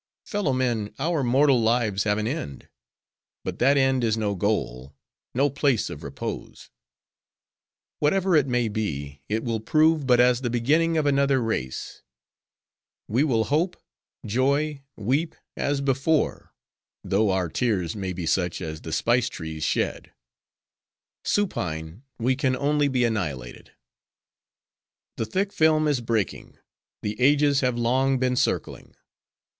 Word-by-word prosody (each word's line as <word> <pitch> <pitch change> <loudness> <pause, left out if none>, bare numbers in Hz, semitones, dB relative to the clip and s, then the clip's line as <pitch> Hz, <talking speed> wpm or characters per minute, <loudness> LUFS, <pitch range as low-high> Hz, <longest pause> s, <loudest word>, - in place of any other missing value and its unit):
Fellow 205 -9 -1
men! 120 -5 -1
our 155 0 0
mortal 130 +1 +4
lives 110 -3 +1
have 105 -1 +2
an 110 - -1
end; 115 - -5 0.8
but - - -5
that 140 +3 +4
end 135 -2 +2
is 110 -1 +1
no 105 -2 0
goal: 85 - -2 0.4
no 140 +3 +3
place 140 -3 0
of - - -8
repose. - - -7 1.3
Whatever 185 +4 +2
it 145 -3 +4
may 125 -2 +1
be, 70 -10 -4
it 110 +2 -1
will 115 -3 -1
prove 155 +4 +2
but 125 -2 +5
as 125 0 +4
the 120 - -1
beginning 155 +8 +2
of 155 - +1
another 140 -1 +3
race. 110 - -3 1.1
We 120 +7 +2
will 120 -7 +2
hope, 165 +8 0 0.5
joy, 140 +6 0
weep, 135 +10 -1 0.2
as 140 -1 -1
before; 140 +3 0 0.5
though 100 +2 +1
our 95 -2 +1
tears 95 -2 -1
may 95 -3 -3
be 90 -1 -5
such 85 +1 0
as 80 -1 -6
the 80 - -7
spice 120 +8 +2
trees 80 -2 -6
shed. - - -1 1.1
Supine 85 - -2 0.2
we 125 +3 +1
can 130 -2 +1
only 145 +2 +1
be, 130 -3 +1
annihilated. 80 - -3 1.4
"'The 115 - -1
thick 195 - -1
film 155 -1 +3
is 145 -4 +1
breaking; 110 -6 -2 0.5
the 105 +3 -4
ages 145 +1 +4
have 125 -3 0
long 130 +3 +2
been 125 0 +1
circling. - - -2
125 Hz, 135 wpm, -25 LUFS, 105-140 Hz, 1.4 s, but